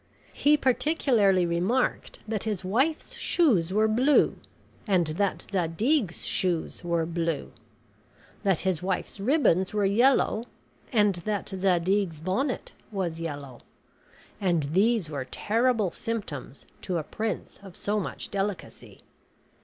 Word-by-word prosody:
He 295 +1 +4
particularly 245 - +2
remarked 180 +10 0
that 215 -2 -2
his 205 -4 -3
wife's 275 - 0
shoes 265 - +2
were 215 +2 +3
blue 255 +7 +3 0.5
and 185 -4 +3
that 180 +6 -1
Zadig's 195 - 0
shoes 175 -3 -1
were 170 -1 0
blue; 165 -2 -2 0.9
that 195 -5 +2
his 185 -4 0
wife's 190 +2 -3
ribbons 210 - +2
were 205 -1 +2
yellow 230 +2 +3 0.5
and 210 -5 +4
that 205 +4 -3
Zadig's 185 -2 +1
bonnet 235 - -2 0.2
was 180 -5 -3
yellow; 145 -6 -6 0.8
and 175 -5 +2
these 210 0 +3
were 140 -4 -4
terrible 220 - +1
symptoms 180 - -5 0.2
to 180 -2 -2
a 160 - -2
prince 215 +6 -4
of 190 -3 -12
so 210 +1 -1
much 195 - -6
delicacy. 200 -1 -4
195 Hz, 120 wpm, -27 LUFS, 170-225 Hz, 0.9 s, He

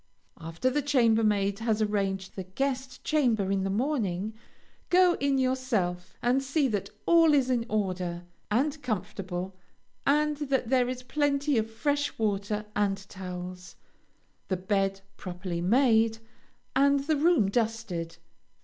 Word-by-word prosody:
After 165 +10 -2
the 295 +3 +1
chambermaid 220 -7 +2
has 225 -1 0
arranged 195 -3 -1
the 190 - -4
guest 260 +6 -3
chamber 230 -10 +1
in 195 -1 +1
the 195 - -1
morning, 215 -4 -1 0.6
go 360 0 +5
in 280 -1 +1
yourself 235 -9 -1
and 250 +3 +3
see 280 +1 +1
that 200 -2 -2 0.2
all 330 -3 +6
is 260 -2 +2
in 235 -2 0
order, 185 -4 -2 0.3
and 285 +7 0
comfortable, 190 -5 -4 0.5
and 300 +1 +3
that 270 -5 -1
there 250 -2 +3
is 255 0 -5
plenty 285 +1 +1
of 220 0 -2
fresh 290 +5 -1
water 210 0 -1
and 195 -1 0
towels, 180 -1 -7 0.7
the 185 - -1
bed 195 0 0 0.2
properly 180 -1 -5
made, 225 +2 +3 0.6
and 280 +1 +4
the 305 +3 +1
room 290 - +3
dusted. 220 -7 -2
220 Hz, 130 wpm, -28 LUFS, 195-270 Hz, 0.7 s, all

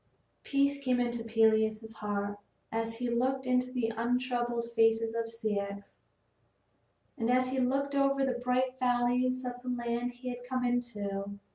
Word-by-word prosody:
Peace 280 0 +1
came 250 -2 +2
into 240 -1 -1
Peleus's 220 0 +2
heart 205 -1 -2 0.3
as 225 0 -1
he 245 +1 -2
looked 260 +3 0
into 250 0 +1
the 235 -3 -1
untroubled 240 0 0
face 225 -1 +5
of 225 0 -2 0.2
Ceyx, 200 -3 -3 1.2
and 225 0 0
as 255 +1 +3
he 265 0 -1
looked 275 +3 +1
over 275 -1 +3
the 250 -2 -1
bright 255 +1 +1
valleys 250 +1 +2
of 245 0 -5
the 250 - -5
land 240 0 -1
he 250 +1 -6
had 245 0 -6
come 255 0 -1
into. 205 -5 -2
245 Hz, 150 wpm, -31 LUFS, 225-255 Hz, 1.2 s, face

